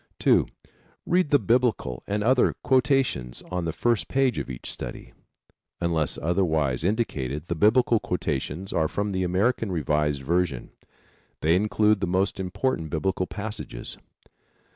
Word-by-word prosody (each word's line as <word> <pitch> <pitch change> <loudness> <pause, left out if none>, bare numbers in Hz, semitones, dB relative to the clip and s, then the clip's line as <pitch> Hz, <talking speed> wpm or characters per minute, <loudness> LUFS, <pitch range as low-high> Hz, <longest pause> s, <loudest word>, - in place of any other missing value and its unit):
(2) - - +3 0.6
Read 180 -2 +2
the 145 - +6
Biblical 115 - +1
and 105 +1 -1
other 125 +2 +3
quotations 130 - +1
on 90 -2 -2
the 80 - -1
first 115 +6 0
page 135 -2 +1
of - - -5
each 60 -2 -7
study. - - -8 0.7
Unless 85 -3 0
otherwise 80 -6 0
indicated 75 - -1
the 90 - -2
Biblical 110 +6 +4
quotations 85 0 -3
are 80 -1 +2
from 100 +5 -2
the 95 -1 -1
American 100 +4 +1
Revised 75 -3 0
Version. 85 -3 -1 0.7
They 80 +2 +3
include 105 +1 +2
the - - 0
most 95 +2 0
important 95 -2 -2
Biblical 90 +3 -1
passages. 105 +4 -6
90 Hz, 135 wpm, -25 LUFS, 80-110 Hz, 0.7 s, the